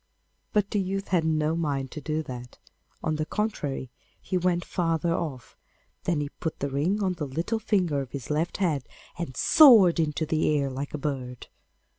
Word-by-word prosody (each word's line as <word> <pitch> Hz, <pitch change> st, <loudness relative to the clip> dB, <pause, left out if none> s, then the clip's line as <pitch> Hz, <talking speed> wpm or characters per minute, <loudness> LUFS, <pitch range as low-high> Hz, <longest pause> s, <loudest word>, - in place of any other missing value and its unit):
But 205 Hz, -1 st, +1 dB
the 205 Hz, -, +1 dB
youth 195 Hz, +1 st, -2 dB
had 175 Hz, -3 st, +2 dB
no 155 Hz, 0 st, +1 dB
mind 140 Hz, -5 st, -2 dB
to 150 Hz, -, -7 dB
do 155 Hz, +2 st, -2 dB
that; 125 Hz, -3 st, -8 dB, 0.5 s
on 155 Hz, -1 st, 0 dB
the 155 Hz, -, -1 dB
contrary, 150 Hz, -, -2 dB, 0.3 s
he 185 Hz, -, -4 dB
went 175 Hz, -1 st, +1 dB
farther 165 Hz, -1 st, 0 dB
off, 140 Hz, -8 st, -4 dB, 0.5 s
then 150 Hz, -5 st, 0 dB
put 160 Hz, -, -3 dB
the 140 Hz, 0 st, -3 dB
ring 175 Hz, +10 st, 0 dB
on 185 Hz, -1 st, +1 dB
the 160 Hz, -5 st, -4 dB
little 165 Hz, -, -2 dB
finger 180 Hz, -9 st, +1 dB
of 135 Hz, -, -7 dB
his 140 Hz, 0 st, -6 dB
left 160 Hz, +3 st, 0 dB
hand, 160 Hz, -9 st, 0 dB, 0.4 s
and 135 Hz, -7 st, -5 dB
soared 225 Hz, -, +7 dB
into 160 Hz, 0 st, 0 dB
the 155 Hz, 0 st, +1 dB
air 140 Hz, -1 st, -1 dB
like 140 Hz, +3 st, -4 dB
a -, -, -2 dB
bird. 130 Hz, -4 st, -4 dB
160 Hz, 180 wpm, -27 LUFS, 140-180 Hz, 0.5 s, soared